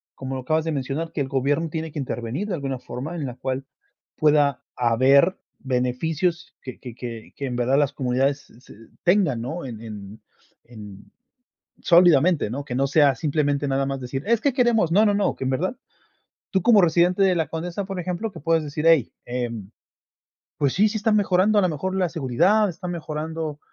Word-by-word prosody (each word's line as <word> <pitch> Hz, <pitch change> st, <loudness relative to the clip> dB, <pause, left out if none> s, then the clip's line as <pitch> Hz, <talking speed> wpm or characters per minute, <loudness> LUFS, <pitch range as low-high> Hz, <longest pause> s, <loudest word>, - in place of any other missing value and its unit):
como 135 Hz, 0 st, -5 dB
lo 130 Hz, -, -4 dB
acabas 155 Hz, +5 st, 0 dB
de 160 Hz, -, -1 dB
mencionar, 145 Hz, +4 st, -3 dB
que 145 Hz, -, -3 dB
el 135 Hz, -, -1 dB
gobierno 140 Hz, +4 st, 0 dB
tiene 160 Hz, 0 st, -4 dB
que 150 Hz, -, -5 dB
intervenir 130 Hz, -, -4 dB
de 200 Hz, -, -3 dB
alguna 135 Hz, -4 st, -4 dB
forma, 140 Hz, +8 st, -6 dB
en 155 Hz, -4 st, -3 dB
la 125 Hz, -2 st, -6 dB
cual 130 Hz, +1 st, -4 dB, 0.5 s
pueda 145 Hz, -3 st, +3 dB
haber 130 Hz, -, +4 dB, 0.2 s
beneficios 150 Hz, +7 st, -1 dB
que 130 Hz, -, -9 dB
que 120 Hz, -3 st, -9 dB
que 115 Hz, -3 st, -8 dB
que 140 Hz, -, -5 dB
en 125 Hz, -2 st, -3 dB
verdad 125 Hz, +3 st, +2 dB
las 145 Hz, -2 st, +2 dB
comunidades 135 Hz, +2 st, -1 dB, 0.5 s
tengan, 175 Hz, -, +2 dB
¿no? 150 Hz, +7 st, -5 dB
En 115 Hz, -4 st, -7 dB
en 105 Hz, -2 st, -9 dB, 0.4 s
en 105 Hz, -4 st, -12 dB, 0.7 s
sólidamente, 170 Hz, -, +4 dB
¿no? 140 Hz, +4 st, -4 dB
Que 125 Hz, -, -6 dB
no 135 Hz, +2 st, +1 dB
sea 140 Hz, -1 st, +4 dB
simplemente 145 Hz, +1 st, 0 dB
nada 135 Hz, 0 st, 0 dB
más 135 Hz, -1 st, -3 dB
decir: 135 Hz, +2 st, -4 dB
"Es 230 Hz, 0 st, +2 dB
que 280 Hz, -, +2 dB
queremos", 240 Hz, -, +2 dB
no, 210 Hz, +5 st, +5 dB
no, 205 Hz, -, +3 dB
no, 200 Hz, 0 st, +1 dB
que -, -, -5 dB
en 130 Hz, -, 0 dB
verdad 180 Hz, -, -1 dB, 0.7 s
tú, 190 Hz, -2 st, +1 dB
como 230 Hz, -3 st, +6 dB
residente 175 Hz, +3 st, +3 dB
de 185 Hz, -1 st, +3 dB
la 160 Hz, -4 st, -1 dB
Condesa, 175 Hz, +4 st, -4 dB
por 195 Hz, -2 st, -5 dB
ejemplo, 180 Hz, +5 st, -3 dB
que 170 Hz, -, -10 dB
puedes 165 Hz, +1 st, +1 dB
decir: 150 Hz, +2 st, -3 dB
"Hey, 160 Hz, -8 st, +4 dB
em, 120 Hz, -5 st, -4 dB, 0.9 s
pues 140 Hz, -3 st, +1 dB
sí, 210 Hz, +3 st, +4 dB
sí 220 Hz, -, -4 dB
está 215 Hz, +1 st, +1 dB
mejorando 205 Hz, 0 st, +3 dB
a 205 Hz, -, +4 dB
lo 185 Hz, -, +2 dB
mejor 185 Hz, +4 st, -3 dB
la 185 Hz, -2 st, +1 dB
seguridad, 165 Hz, -, +2 dB
está 180 Hz, 0 st, -6 dB
mejorando 160 Hz, -2 st, -4 dB
150 Hz, 190 wpm, -23 LUFS, 130-175 Hz, 0.9 s, como